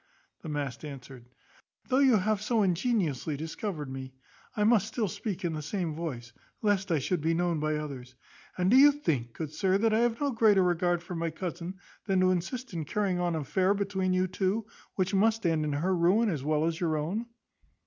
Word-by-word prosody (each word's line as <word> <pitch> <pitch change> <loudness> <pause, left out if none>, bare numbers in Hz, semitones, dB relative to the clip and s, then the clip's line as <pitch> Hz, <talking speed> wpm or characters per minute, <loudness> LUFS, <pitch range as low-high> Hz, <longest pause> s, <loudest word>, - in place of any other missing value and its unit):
The 160 - -7
mask 145 -4 -4
answered, 130 -4 -10 0.6
"Though 260 0 +2
you 265 -4 +5
have 210 +1 0
so 220 0 +1
ingeniously 175 - 0
discovered 160 0 -4
me, 130 0 -7 0.4
I 210 - +2
must 215 -2 +4
still 220 -1 -1
speak 190 +1 -4
in 165 - -1
the 155 - -4
same 165 +1 -3
voice, 130 -7 -6 0.3
lest 200 -2 +1
I 165 - +3
should 155 +4 -1
be 165 +2 +1
known 175 -2 0
by 155 0 0
others. 135 -4 -6 0.4
And 180 +2 +2
do 255 - +7
you 290 +2 +9
think, 140 - -2
good 155 -2 -6
sir, 190 0 +2
that 220 +1 +2
I 220 - +3
have 235 -1 +1
no 285 -1 0
greater 215 -5 +4
regard 175 -1 +1
for 180 - -7
my 165 -1 -1
cousin, 175 +2 -5 0.3
than 190 -2 +2
to 185 0 +4
assist 195 +7 -3
in 165 -2 -2
carrying 190 +3 -1
on 175 -2 0
an 160 - -1
affair 190 +7 +1
between 195 -2 -1
you 185 0 +2
two, 190 +4 -1 0.3
which 185 +1 0
must 220 +2 +2
end 160 -2 +2
in 150 - -1
her 180 +6 +1
ruin, 190 +7 +3
as 150 -8 -2
well 155 +1 +1
as 165 0 -1
your 160 -3 0
own? 190 +10 -2
180 Hz, 210 wpm, -29 LUFS, 155-205 Hz, 0.6 s, you